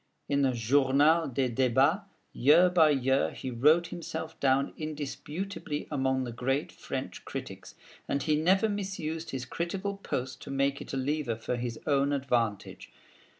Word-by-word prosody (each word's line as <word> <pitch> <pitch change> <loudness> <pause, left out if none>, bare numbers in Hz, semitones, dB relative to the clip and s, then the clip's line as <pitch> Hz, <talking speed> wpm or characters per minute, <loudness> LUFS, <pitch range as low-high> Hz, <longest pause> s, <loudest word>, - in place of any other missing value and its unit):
In 140 0 +1
the 135 -2 +2
Journal 140 +7 +3
des 130 -1 -1
Débats, 135 - +2 0.3
year 165 +7 +5
by 165 -4 +5
year, 135 -1 +2
he 130 - -5
wrote 155 +8 +4
himself 160 -2 -6
down 135 0 +2
indisputably 155 +2 -5
among 130 -2 0
the 120 - -5
great 135 +4 -1
French - - -6
critics; - - -8 0.3
and 140 - 0
he 155 0 +2
never 185 +7 +3
misused 185 -6 -4
his 130 -2 -4
critical 190 +8 -3
post 130 -9 -4
to - - -9
make 140 0 0
it - - -8
a - - -1
lever 135 -2 -1
for 115 +2 -3
his 120 -1 -4
own 140 0 +2
advantage. 120 -7 -1
140 Hz, 150 wpm, -29 LUFS, 130-160 Hz, 0.3 s, year